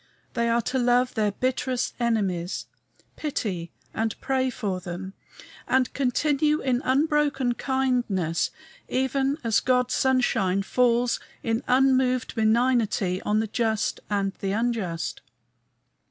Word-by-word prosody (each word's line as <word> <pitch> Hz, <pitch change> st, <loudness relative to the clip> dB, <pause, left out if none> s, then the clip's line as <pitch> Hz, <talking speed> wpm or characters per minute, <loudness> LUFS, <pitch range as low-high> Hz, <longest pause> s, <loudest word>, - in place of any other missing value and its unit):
They 235 Hz, -1 st, +1 dB
are 235 Hz, 0 st, +2 dB
to 260 Hz, +3 st, -1 dB
love 245 Hz, +1 st, +3 dB
their 210 Hz, -2 st, +1 dB
bitterest 255 Hz, +2 st, -1 dB
enemies, 200 Hz, -7 st, -1 dB, 0.5 s
pity 190 Hz, -, -3 dB, 0.2 s
and 225 Hz, -1 st, -2 dB
pray 260 Hz, -1 st, 0 dB
for 205 Hz, -7 st, -3 dB
them, 180 Hz, +2 st, -6 dB, 0.5 s
and 260 Hz, -1 st, +2 dB
continue 290 Hz, +3 st, +1 dB
in 255 Hz, -2 st, 0 dB
unbroken 285 Hz, -2 st, +2 dB
kindness, 240 Hz, -, 0 dB, 0.4 s
even 270 Hz, +2 st, 0 dB
as 225 Hz, -2 st, +3 dB
God's 250 Hz, -1 st, +1 dB
sunshine 200 Hz, -7 st, +2 dB
falls 245 Hz, +2 st, +2 dB, 0.2 s
in 225 Hz, +1 st, 0 dB
unmoved 255 Hz, -1 st, +3 dB
benignity 220 Hz, -4 st, +2 dB
on 215 Hz, +1 st, +1 dB
the -, -, -1 dB
just 220 Hz, -1 st, 0 dB
and 200 Hz, -2 st, 0 dB
the 195 Hz, 0 st, -1 dB
unjust! 210 Hz, -7 st, -2 dB
240 Hz, 115 wpm, -25 LUFS, 205-260 Hz, 0.5 s, love